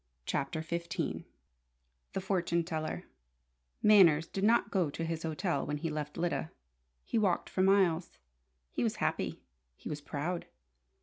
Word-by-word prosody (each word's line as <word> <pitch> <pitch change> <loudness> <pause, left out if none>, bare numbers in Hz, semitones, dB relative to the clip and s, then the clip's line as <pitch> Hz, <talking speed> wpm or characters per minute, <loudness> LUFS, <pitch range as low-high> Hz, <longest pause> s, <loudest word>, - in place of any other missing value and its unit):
CHAPTER 145 +3 -1
XV 170 +1 -3 0.9
THE 195 - -1
FORTUNE 175 -3 +1
TELLER 160 -2 -3 0.8
Manners 175 -7 +7
did 195 - -4
not 225 -1 +4
go 180 -6 +2
to 165 +3 -4
his 165 -1 -2
hotel 160 -1 -1
when 150 0 -2
he 165 +2 -3
left 150 -1 -4
Lyda. 170 -2 -1 0.6
He 230 - +1
walked 190 -5 +1
for 185 - +1
miles. 185 -3 +3 0.5
He - - -2
was - - +1
happy. - - -1 0.3
He - - -8
was 150 -1 -4
proud. 160 +5 -3
170 Hz, 140 wpm, -32 LUFS, 155-190 Hz, 0.9 s, Manners